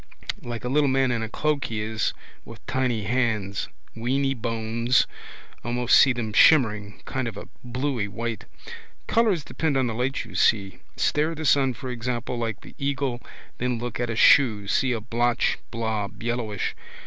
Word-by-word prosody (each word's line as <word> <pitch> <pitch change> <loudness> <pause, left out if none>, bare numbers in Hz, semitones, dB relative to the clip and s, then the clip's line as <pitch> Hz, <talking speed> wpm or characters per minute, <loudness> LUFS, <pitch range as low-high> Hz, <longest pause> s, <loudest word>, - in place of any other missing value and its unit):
Like 120 -4 -6
a - - -2
little 145 +3 +3
man 130 -1 +2
in 115 -2 -1
a 110 - -3
cloak 150 +3 0
he 110 -2 -3
is 110 0 -1 0.3
with - - -13
tiny 125 -5 0
hands. 110 -3 -1 0.3
Weeny 135 +4 0
bones. 115 0 +1 0.6
Almost 120 +1 +2
see 135 - +7
them 115 -3 -3
shimmering, 105 -8 +4
kind 130 -2 -2
of 110 -3 -6
a - - -8 0.2
bluey 125 -3 -2
white. 115 +1 -4 0.6
Colours 215 -9 +2
depend 155 -2 -1
on 130 - +2
the 115 - -2
light 125 +4 -1
you - - -12
see. 100 -3 +2 0.2
Stare 155 +2 +1
the 160 0 -5
sun 135 -2 +3
for 130 +3 -6
example 120 +1 -3
like 115 -3 -3
the - - -13
eagle 140 -3 -1 0.4
then 125 -1 0
look 120 0 -5
at 120 -1 -1
a 115 - -2
shoe 110 -4 +5
see 130 +6 +2
a 120 - 0
blotch 120 +2 +1
blob 110 -3 -3
yellowish. 115 -4 -2
120 Hz, 170 wpm, -25 LUFS, 110-130 Hz, 0.6 s, see